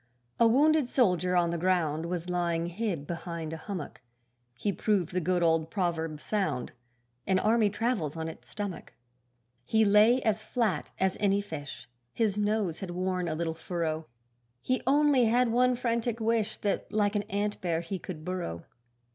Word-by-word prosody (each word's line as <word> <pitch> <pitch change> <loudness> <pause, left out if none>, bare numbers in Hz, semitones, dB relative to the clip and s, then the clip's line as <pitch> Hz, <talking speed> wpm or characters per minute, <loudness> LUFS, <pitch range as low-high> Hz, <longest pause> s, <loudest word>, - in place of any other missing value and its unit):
A 230 - +6
wounded 290 +3 +4
soldier 180 -8 +2
on 170 -1 +3
the 170 - -2
ground 165 -3 +1
Was 175 0 -3
lying 170 -2 0
hid 175 -4 -3
behind 170 -1 -5
a - - -4
hummock; 175 -3 -6 0.6
He 200 +10 -1
proved 195 -6 0
the 180 0 0
good 180 +1 +1
old 165 -1 +2
proverb 165 -5 -2
sound 190 - -2 0.6
An 190 - +3
army 215 +1 +3
travels 205 - -1
on 160 0 -3
its 160 - -10
stomach. 205 -5 -6 0.7
He 220 - +3
lay 210 +5 +6
as 220 -1 +1
flat 215 -7 -1
as 190 0 +1
any 200 -1 +3
fish, 145 -10 -7 0.3
His 220 -4 +1
nose 210 -5 0
had 190 - -5
worn 180 0 -1
a 160 - -1
little 165 0 -2
furrow; 160 -1 -3 0.6
He 255 0 0
only 285 -2 +4
had 240 +2 +3
one 250 +2 +3
frantic 235 -1 -1
wish, 220 -1 0
That 205 - -2
like 210 0 +1
an 205 -1 0
antbear 195 -5 -1
he 185 +3 -4
could 160 -4 -8
burrow. 180 - -4
185 Hz, 165 wpm, -29 LUFS, 170-220 Hz, 0.7 s, A